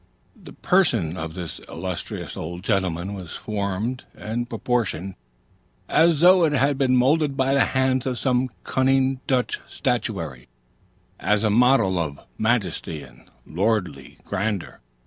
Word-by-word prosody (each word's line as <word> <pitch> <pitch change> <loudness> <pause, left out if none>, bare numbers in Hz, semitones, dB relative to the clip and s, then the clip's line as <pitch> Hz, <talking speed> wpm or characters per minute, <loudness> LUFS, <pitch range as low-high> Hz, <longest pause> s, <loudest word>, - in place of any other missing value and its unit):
The - - -13
person 115 - +2
of 80 -2 -5
this 85 -3 -6
illustrious 90 +1 -5
old 85 +3 -6
gentleman 95 -2 -1
was 90 -5 -8
formed 105 +4 -3
and 120 +3 -4
proportioned 115 -6 -1 0.7
as 165 -2 +4
though 180 0 +7
it 155 -2 +3
had 140 +1 +2
been 130 -2 +3
moulded 140 +2 +2
by 135 0 +2
the 140 - +4
hands 130 0 +1
of 125 -2 -1
some 130 0 +1
cunning 135 0 +2
Dutch 125 -2 0
statuary, 65 -7 -2 0.7
as 105 +1 +1
a 110 - +2
model 115 -5 +4
of 75 -4 -3 0.2
majesty 105 -9 -1
and - - -17 0.2
lordly 90 - -1
grandeur. 100 -1 -3
110 Hz, 130 wpm, -23 LUFS, 90-130 Hz, 0.7 s, though